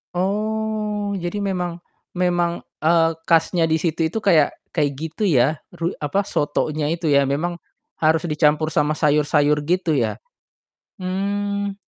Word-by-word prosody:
Oh, 210 +1 -1
jadi 175 +2 -3
memang 180 -3 -2 0.3
memang, 175 -1 0 0.2
eee, 165 0 +4
khasnya 165 +1 +2
di 160 0 +2
situ 165 -1 0
itu 220 - -2
kayak 165 -8 +4 0.2
kayak 145 -3 +2
gitu 160 +7 -4
ya, 150 -4 +3 0.2
ru 170 +2 -3
apa, 195 +8 0
sotonya 150 +1 -1
itu 165 -1 -2
ya 140 -1 +4
memang 155 +6 -1 0.4
harus 160 +1 +2
dicampur 150 0 +2
sama 150 -1 +1
sayur-sayur 150 -1 +2
gitu 170 0 +1
ya? 115 -5 -1 0.8
Mmm. 200 +2 -2
170 Hz, 130 wpm, -21 LUFS, 150-195 Hz, 0.8 s, eee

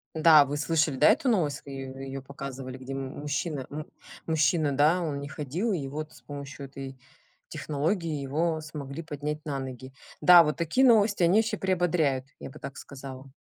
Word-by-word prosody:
Да, 155 -2 +7
вы 140 +1 -3
слышали, 150 -1 +1
да, 150 - +6
эту 265 - +3
новость, 155 - +1
ее 135 -1 -7
ее 135 0 -6
показывали, 135 -1 -7
где 130 +1 -7
му 135 -1 -4
мужчина 145 -1 -3
му 150 +1 -6 0.4
мужчина, 155 -2 +2
да, 155 +6 +4
он 150 -4 -2
не 140 0 -6
ходил, 155 - -2
и 155 -8 -2
вот 150 +3 -5
с - - -17
помощью 140 -1 -8
этой 135 -1 -9 0.5
технологии, 155 +1 -2
его 160 +4 0
смогли 150 0 -7
поднять 150 0 -5
на 140 -3 -2
ноги. 130 0 -7 0.3
Да, 175 -1 +9
вот 150 -1 -1
такие 170 +11 +2
новости, 215 -5 +4
они 175 +4 +5
еще 225 -1 0
приободряют, 175 -8 +1
я - - -7
бы - - -13
так 140 - -7
сказала. 135 -1 -10
150 Hz, 180 wpm, -28 LUFS, 135-165 Hz, 0.5 s, Да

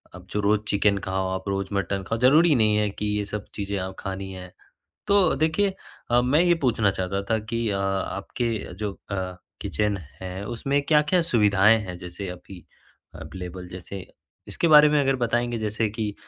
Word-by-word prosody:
आप 90 0 -12
जो 105 - -1
रोज़ 105 +1 +2
चिकन 100 0 +2
खाओ, 95 0 -1
आप 95 +1 -4
रोज 100 0 -1
मटन 100 0 -1
खा - - -1
ज़रूरी 150 +7 +5
नहीं 110 -3 +3
है 105 -1 +1
कि 105 +1 -5
ये 105 - -1
सब 100 - -5
आप - - -22
चीज़ें 100 -2 -3
खानी 95 0 -5
हैं। 90 -1 -9 0.6
तो 200 -2 +4
देखिए 160 +6 +1 0.4
अ, 120 0 +5
मैं 135 +6 +3
ये 175 -1 +4
पूछना 110 -5 +2
चाहता 95 +1 -2
था 110 - +3
कि 115 +2 -3
अ, 100 -1 -1
आपके 100 +3 -2
जो 105 +1 -3 0.2
अ, 95 -2 -3 0.3
किचन 105 -1 -1 0.2
है, 95 +2 -5
उसमें 135 +6 -1
क्या-क्या 155 +4 +3
सुविधाएँ 105 -1 +5
हैं? 90 -3 -7
जैसे 90 +2 -7
अभी 90 +1 -10 0.5
अवेलेबल, 90 -1 -8
जैसे 90 +1 -8 0.4
इसके 170 - 0
बारे 150 -1 +8
में 150 0 +3
अगर 135 -1 +2
बताएँगे, 120 0 0
जैसे 110 0 -1
कि 105 0 -3
105 Hz, 180 wpm, -25 LUFS, 95-120 Hz, 0.6 s, बारे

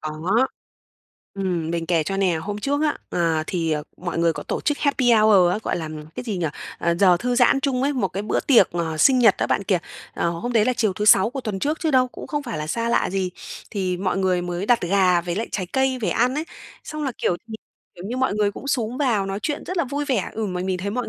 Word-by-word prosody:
Có. 170 +11 0 0.9
Ừm, 180 -5 -2
mình 170 -1 -2
kể 170 -2 +2
cho 195 +5 -3
nè, 190 -4 +2
hôm 205 +6 -4
trước 285 +6 -1
á, 300 -1 0
à, 165 -2 0
thì, 165 -3 -1
à, 150 - 0 0.2
mọi 175 -1 -4
người 170 0 +3
có - - -6
tổ - - -3
chức 295 -1 0
Happy 265 -4 +2
Hour 215 -5 +5
á, 210 - -1
gọi - - -1
là, 160 -2 -4 0.3
cái - - -6
gì 215 -5 -3
nhỉ 175 -3 -1 0.3
ờ, 170 0 +1
giờ 185 -3 +6
thư 245 +7 -1
giãn 245 +2 +4
chung 260 -2 0
ấy, 285 +2 +1
một 240 -8 0
cái 195 +3 -4
bữa 210 - 0
tiệc, 235 -9 +5
ờ, 165 -2 -2
sinh 255 - +5
nhật 225 -5 +6
đó - - 0
bạn - - 0
kìa. 185 -2 +2 0.4
Ờ, 170 - 0
hôm 210 +9 -4
đấy 225 -3 +4
là 255 - +2
chiều 220 -5 0
thứ 210 - -3
Sáu 210 +1 +6
của 270 +1 -5
tuần 215 -5 -4
trước 300 +8 -1
chứ 320 - 0
đâu, 255 -2 +3
cũng - - -10
không 295 -1 -3
phải 155 - -5
là 150 - -4
xa 230 +8 -1
lạ 235 - +1
gì, 190 -1 -1 0.4
thì 185 -3 -1
mọi 190 +1 -1
người 185 -2 +1
mới 175 +2 -3
đặt 245 0 +4
gà 180 -1 +3
với 170 0 -4
lại 225 - -2
trái 185 -3 -2
cây 265 -1 +1
về 215 - -1
ăn 250 +2 +1
ấy, 305 +2 -2 0.4
xong 305 -1 -5
là, 265 - -2
kiểu, 175 - +1
thì, 220 - -7 0.4
kiểu 175 - -10
như, 240 +4 -4
mọi 260 -5 +1
người 210 -1 +1
cũng 260 - -9
xúm 240 -3 -1
vào 235 -9 +1
nói 195 0 -3
chuyện 295 -2 -3
rất 370 - -5
là 340 - +2
vui 285 +3 -3
vẻ 255 -9 -1
ừm, 215 -3 -3
mà 180 - -3
mình 185 -1 -1
thấy 200 +3 -3
mọi 245 +3 -3
205 Hz, 270 wpm, -23 LUFS, 180-250 Hz, 0.9 s, giờ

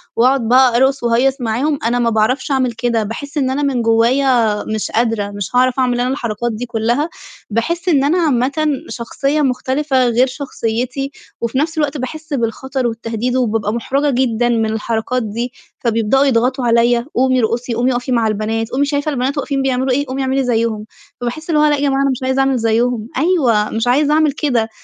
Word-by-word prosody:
وأقعد 250 0 +2
بقى 250 0 +5
أرقص 265 +1 +2
واهيّص 250 +3 +2
معاهم، 255 +6 0
أنا 245 +1 +1
ما 235 -1 +2
باعرفش 225 +6 0
أعمل 260 -2 +1
كده، 230 -1 -1
باحس 285 +8 -6
إن 260 -2 +1
أنا 280 +2 -1
من 265 -4 0
جوّايا 230 -1 +2
مش 220 -1 -3
قادرة، 225 -3 0
مش 205 +3 -5
هاعرف 255 +1 +3
أعمل 245 -1 +1
أنا 250 +1 0
الحركات 235 -3 -2
دي 230 +3 -4
كلها، 240 +7 -1 0.4
باحس 335 - -1
إن 280 -5 +3
أنا 315 +6 +2
عامةً 290 0 +1 0.2
شخصية 275 +5 -2
مختلفة 260 0 +1
غير 240 +2 +3
شخصيتي، 255 0 -3 0.3
وفي 235 +2 -2
نفْس 315 +3 -1
الوقت 295 -1 0
باحس 310 +4 -6
بالخطر 260 +1 -2
والتهديد 230 +2 -3
وبابقى 225 -4 0
مُحرَجة 275 +5 0
جدًا 240 -1 +1
من 225 -2 +1
الحركات 225 +3 -2
دي، 235 +4 -4 0.3
فبيبدأوا 230 +3 +2
يضغطوا 255 0 +1
عليَّ، 235 +1 +3
"قومي 255 +1 +3
ارقصي، 235 +1 -1
قومي 245 +2 +1
اقفي 245 +2 -3
مع 230 -3 +2
البنات، 220 +1 -2
قومي 280 +3 +1
شايفة 285 +1 -1
البنات 270 +1 -1
واقفين 275 -1 -1
بيعملوا 260 0 0
إيه 285 +3 +1
قومي 265 +1 -3
اعملي 265 0 0
زَيّهم." 225 -3 -1 0.4
فباحس 310 +8 -5
اللي 305 -2 +2
هو 300 - +5
لأ 295 - +3
يا 285 - -4
جماعة 275 -1 +1
أنا 275 - +2
مش 260 0 -4
عايزة 260 +1 0
أعمل 270 -1 +2
زَيّهم 230 0 0
أيوه 260 - +2
مش 225 +2 -2
عايزة 290 +4 +3
أعمل 310 -1 +3
كده، 245 -6 0
250 Hz, 190 wpm, -17 LUFS, 230-275 Hz, 0.4 s, بقى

